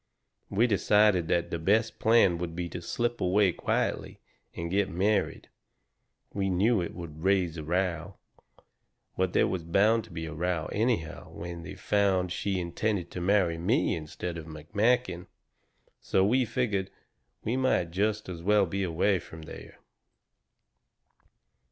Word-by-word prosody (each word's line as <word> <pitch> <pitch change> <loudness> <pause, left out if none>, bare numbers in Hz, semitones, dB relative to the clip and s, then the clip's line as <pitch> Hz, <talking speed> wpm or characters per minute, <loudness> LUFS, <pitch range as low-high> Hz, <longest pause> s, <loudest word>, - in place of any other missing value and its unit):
"We 105 +5 +3
decided 105 -4 +3
the 85 0 0
best 110 +7 +1
plan 110 -6 +4
would 85 -1 -4
be 90 0 -3
to 85 - -6
slip 120 +7 -2
away 95 +1 +3
quietly - - -2 0.4
and 85 0 -4
get 100 0 +1
married. 100 +4 0 0.9
We 95 -1 -1
knew 100 +4 +2
it 85 - -5
would 80 -3 -8
raise 95 -4 +2
a 80 - -5
row. 90 +1 -1 1.0
But 95 -1 0
there - - +4
was 95 -2 -2
bound 105 +7 +3
to - - -17
be 80 -1 -5
a 80 - -6
row 85 0 -1
anyhow 105 -8 -1
when 85 0 -7
they 80 - -8
found 95 -3 +1
she 95 +1 -1
intended 90 +1 -2
to 90 - -5
marry 90 -3 +2
me 110 - +1
instead 85 +2 -5
of 80 - -10
McMakin. 100 +6 0 0.7
So 95 - +2
we 125 +5 +3
figured 105 -5 -1 0.5
we 115 - -1
might 130 -10 +1
just 105 +4 0
as 85 -2 -6
well 105 +2 +4
be 100 +3 -3
away 95 +2 +1
from 80 -1 -11
there. - - -11
95 Hz, 145 wpm, -28 LUFS, 85-105 Hz, 1.0 s, plan